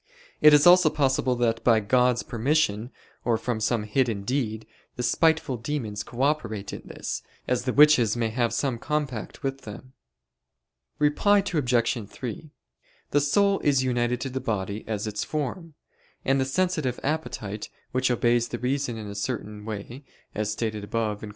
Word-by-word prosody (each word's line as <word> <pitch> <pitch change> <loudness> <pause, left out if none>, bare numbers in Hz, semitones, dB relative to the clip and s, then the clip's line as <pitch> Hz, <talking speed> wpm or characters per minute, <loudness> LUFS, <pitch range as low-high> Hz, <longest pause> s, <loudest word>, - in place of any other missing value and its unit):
It 150 - +9
is 150 0 +6
also 175 -2 +7
possible 130 -3 +1
that 115 -2 0
by 115 -2 +5
God's 125 +3 +2
permission, 120 -2 0 0.3
or 115 -2 +2
from 120 -1 -2
some 115 0 0
hidden 110 -2 0
deed, 110 -2 -2 0.3
the 125 - -3
spiteful 160 +1 +2
demons 115 -4 -3
co 125 +4 -4
operate 115 -9 -1
in - - -6
this, - - -5 0.3
as 125 0 0
the 130 - +1
witches 140 -7 +5
may 115 -1 0
have 115 +1 0
some 130 -5 -1
compact 140 -7 -3
with 135 0 -3
them. 110 +5 -10 1.0
Reply 200 +7 +3
Obj. 120 - +1
3: 125 +7 -7 0.6
The 145 - +3
soul 200 +7 +3
is 140 -3 +2
united 120 -1 0
to 135 - -3
the 130 - -2
body 105 -4 -3
as 105 -2 -2
its 105 -1 -3
form; 155 +2 -4 0.5
and 135 0 +2
the - - +1
sensitive 155 -4 0
appetite, 125 -9 -3 0.2
which 130 0 +1
obeys 120 -1 +2
the 120 - -4
reason 125 -1 -1
in 110 - -6
a 100 - -6
certain 105 -1 -4
way, 110 +5 -7 0.3
as 105 0 -2
stated 105 -1 -3
above 105 0 -2
(Q. 110 - -8
125 Hz, 165 wpm, -26 LUFS, 110-140 Hz, 1.0 s, It